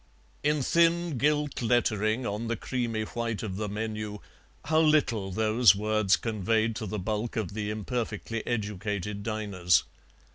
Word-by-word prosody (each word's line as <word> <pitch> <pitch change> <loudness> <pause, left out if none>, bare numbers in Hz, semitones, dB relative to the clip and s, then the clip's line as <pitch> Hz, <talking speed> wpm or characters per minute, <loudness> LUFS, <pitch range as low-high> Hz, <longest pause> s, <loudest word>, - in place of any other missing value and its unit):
In 150 -1 +1
thin 170 -2 +2
gilt 150 0 +1
lettering 110 0 +1
on 105 +3 -3
the 115 - 0
creamy 115 -2 -2
white 115 0 -3
of 95 -4 -4
the 105 -1 -2
menu 105 0 -4 0.5
how 155 +1 +3
little 145 -11 +3
those 110 +1 +5
words 105 -1 +2
conveyed 110 +1 0
to 110 - -4
the 105 - -3
bulk 105 +3 -2
of 105 -4 -2
the 105 -1 -3
imperfectly 110 0 -3
educated 105 -2 -2
diners. 100 -6 +1
110 Hz, 140 wpm, -28 LUFS, 105-120 Hz, 0.5 s, those